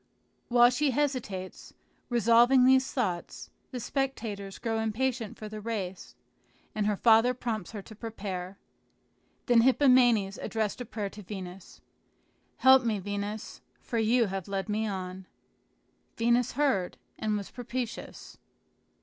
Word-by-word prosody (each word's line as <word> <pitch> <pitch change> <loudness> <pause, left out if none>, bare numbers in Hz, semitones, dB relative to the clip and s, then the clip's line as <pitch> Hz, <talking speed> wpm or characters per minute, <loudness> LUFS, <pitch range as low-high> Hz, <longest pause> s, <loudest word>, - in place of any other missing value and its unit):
While 240 0 +6
she 290 +3 +1
hesitates, 250 -9 -3 0.3
revolving 240 +2 +5
these 260 0 +4
thoughts, 185 - -3 0.2
the 255 - -5
spectators 225 -6 -3
grow 225 -2 -2
impatient 225 +1 -2
for 215 - -7
the 215 0 -7
race, 200 -5 -5 0.6
and 210 -1 -1
her 210 - +1
father 230 +3 +5
prompts 220 -6 -4
her 205 -3 -6
to 220 - -12
prepare. 195 -4 -6 0.9
Then 240 -1 +5
Hippomenes 245 -6 +4
addressed 220 +1 -2
a - - -4
prayer 210 -3 -5
to 210 - -10
Venus: 190 -2 -9 0.8
"Help 260 0 +6
me, 225 -3 0
Venus, 205 +2 -5 0.2
for 235 - -3
you 230 +2 +3
have 195 -3 -4
led 195 0 -3
me 215 +1 0
on." 185 -1 -5 0.9
Venus 235 +1 +2
heard 260 -10 0 0.2
and 215 -1 0
was 200 - -7
propitious. 245 0 -6
220 Hz, 130 wpm, -29 LUFS, 200-245 Hz, 0.9 s, While